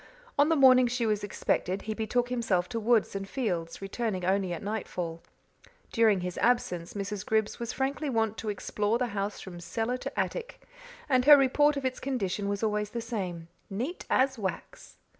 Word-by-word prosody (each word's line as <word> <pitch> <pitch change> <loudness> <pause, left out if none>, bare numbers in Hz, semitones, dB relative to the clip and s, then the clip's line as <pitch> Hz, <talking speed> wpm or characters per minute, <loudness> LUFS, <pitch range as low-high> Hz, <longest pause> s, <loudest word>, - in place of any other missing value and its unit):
On 290 +2 +4
the 325 - +4
morning 255 -3 +7
she 240 0 -1
was 210 -2 0
expected 195 -1 -1
he 215 - -3
betook 235 +3 -1
himself 225 -8 0
to 230 -2 -2
woods 225 -2 +2
and 195 0 -4
fields, 180 -9 -3
returning 195 -2 -2
only 190 0 +1
at 175 - -4
night 215 +1 -3
fall. 165 -2 -4 0.7
During 220 -5 +3
his 180 0 -4
absence 195 -9 +1
Mrs. 200 0 -3
Griggs 220 0 0
was 235 0 -3
frankly 275 +2 -2
wont 225 -3 +1
to 220 - -3
explore 210 +2 -1
the 245 -1 -1
house 200 0 -2
from 175 -2 -9
cellar 225 +8 -2
to - - -5
attic, - - -3 0.4
and 255 -3 +3
her 295 0 +10
report 285 +2 +3
of 275 - -3
its 255 0 -1
condition 205 -6 -2
was 200 +1 -2
always 210 -1 0
the 235 - -4
same 190 -8 -4 0.2
"neat 250 - -4
as 260 -1 +2
wax." 190 -5 -6
220 Hz, 185 wpm, -29 LUFS, 195-250 Hz, 0.7 s, her